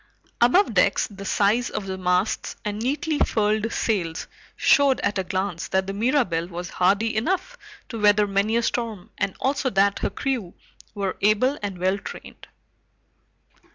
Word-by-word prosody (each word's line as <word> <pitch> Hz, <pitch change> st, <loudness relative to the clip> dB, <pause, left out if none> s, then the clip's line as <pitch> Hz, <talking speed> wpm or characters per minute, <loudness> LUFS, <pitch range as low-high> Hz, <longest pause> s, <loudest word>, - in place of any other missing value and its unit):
Above 250 Hz, -, +4 dB
decks, 200 Hz, +1 st, +3 dB
the 200 Hz, -1 st, -10 dB
size 210 Hz, +5 st, +1 dB
of 200 Hz, -, -4 dB
the 190 Hz, -1 st, -4 dB
masts 180 Hz, +2 st, 0 dB
and 210 Hz, 0 st, -3 dB
neatly 295 Hz, +6 st, -1 dB
furled 215 Hz, +1 st, +1 dB
sails 175 Hz, -8 st, -1 dB, 0.3 s
showed 280 Hz, -2 st, +4 dB
at 205 Hz, -1 st, 0 dB
a -, -, 0 dB
glance 185 Hz, -1 st, -3 dB
that 190 Hz, 0 st, 0 dB
the 195 Hz, -, -4 dB
Mirabelle 210 Hz, -, +1 dB
was 175 Hz, 0 st, -6 dB
hardy 200 Hz, +5 st, +1 dB
enough 375 Hz, -, -1 dB, 0.3 s
to 230 Hz, -, -6 dB
weather 210 Hz, 0 st, +5 dB
many 200 Hz, +3 st, +1 dB
a 235 Hz, -, +1 dB
storm, 225 Hz, -6 st, -3 dB
and 190 Hz, -, -1 dB
also 275 Hz, 0 st, 0 dB
that 200 Hz, -2 st, +2 dB
her -, -, -1 dB
crew 245 Hz, -10 st, -3 dB, 0.4 s
were 195 Hz, -2 st, -2 dB
able 215 Hz, +7 st, +3 dB
and 200 Hz, -3 st, -4 dB
well 185 Hz, +3 st, 0 dB
trained. -, -, -10 dB
205 Hz, 155 wpm, -24 LUFS, 190-240 Hz, 0.4 s, weather